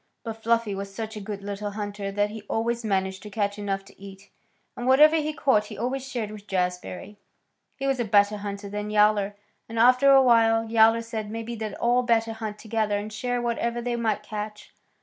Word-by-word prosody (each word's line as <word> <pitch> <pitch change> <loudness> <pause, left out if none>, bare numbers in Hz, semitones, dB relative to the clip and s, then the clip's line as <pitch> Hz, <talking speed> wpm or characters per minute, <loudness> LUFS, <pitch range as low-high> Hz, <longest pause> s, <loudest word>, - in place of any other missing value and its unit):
But 225 -1 -6
Fluffy 230 -2 +1
was 195 0 -5
such 220 +2 -6
a - - -5
good 200 0 -6
little 205 +1 -4
hunter 205 -1 -4
that 205 +1 0
he 220 0 -7
always 235 +1 -1
managed 190 -2 -1
to 210 - -9
catch 205 0 -2
enough 195 -1 -3
to 195 - -19
eat, 195 0 -12 0.4
and 245 - -4
whatever 300 +5 +6
he 310 0 -1
caught 265 -8 +2
he - - -9
always 260 +4 -3
shared 225 -5 -3
with 205 -1 -11
Jazbury. 180 +2 -3 0.6
He 275 - -4
was 270 -2 +1
a - - +2
better 205 -1 +3
hunter 200 0 -6
than 210 +1 -4
Yowler, 210 -1 +3 0.3
and 230 - -6
after 250 +4 +5
a 270 -1 +7
while 225 -2 +4
Yowler 225 +1 +4
said 220 -2 -5
maybe 230 +2 -5
they'd 220 -3 -5
all 240 +1 +2
better 230 -2 +1
hunt 220 -1 -6
together 215 -2 -1
and 210 +1 -6
share 245 +2 -2
whatever 235 0 -1
they 240 0 -2
might 220 -3 -1
catch. 210 0 -7
215 Hz, 205 wpm, -25 LUFS, 205-235 Hz, 0.6 s, a